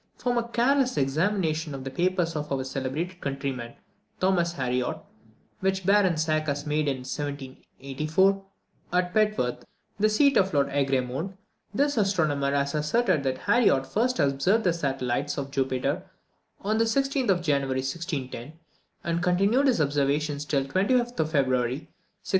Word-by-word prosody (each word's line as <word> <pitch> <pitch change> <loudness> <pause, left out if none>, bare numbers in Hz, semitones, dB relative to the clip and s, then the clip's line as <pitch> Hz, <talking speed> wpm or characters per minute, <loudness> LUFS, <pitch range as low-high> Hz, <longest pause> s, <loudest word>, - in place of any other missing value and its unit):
From 245 -1 -1
a 235 - -4
careless 255 +2 +2
examination 160 +1 0
of 135 - -7
the 135 - -5
papers 175 0 0
of 150 -1 -4
our 135 -1 0
celebrated 140 +8 -4
countryman, 135 -4 -4 0.4
Thomas 175 -2 +2
Harriot, 125 -4 -1 0.6
which 190 -1 -1
Baron 195 -4 +4
Zach 155 0 0
had 145 0 -2
made 150 0 0
in 135 -2 -2
1784, 145 +6 -1 0.5
at 180 0 +1
Petworth, 210 - +1 0.4
the 215 +1 +4
seat 280 +6 +4
of 190 -4 +2
Lord 140 -1 +3
Egremont, 135 +6 -1 0.3
this 285 +6 +1
astronomer 155 -9 +1
has 140 0 0
asserted 155 +3 +1
that 130 -1 -1
Harriot 170 - +3
first 245 - 0
observed 145 +10 +2
the 180 - +2
satellites 135 -3 -2
of 140 -1 -4
Jupiter 135 +4 -1 0.6
on 215 +2 0
the 230 - +4
16th 270 +1 0
of 175 -3 +2
January, 135 -4 +1
1610; 135 -3 -5 0.5
and 170 0 -1
continued 195 +10 +3
his 255 - +2
observations 145 0 0
till 140 -2 +1
the 135 - -10
25th 240 - +1
of 155 -1 +1
February, 130 -4 +2
1612. 150 +3 -10
155 Hz, 145 wpm, -26 LUFS, 135-195 Hz, 0.6 s, Baron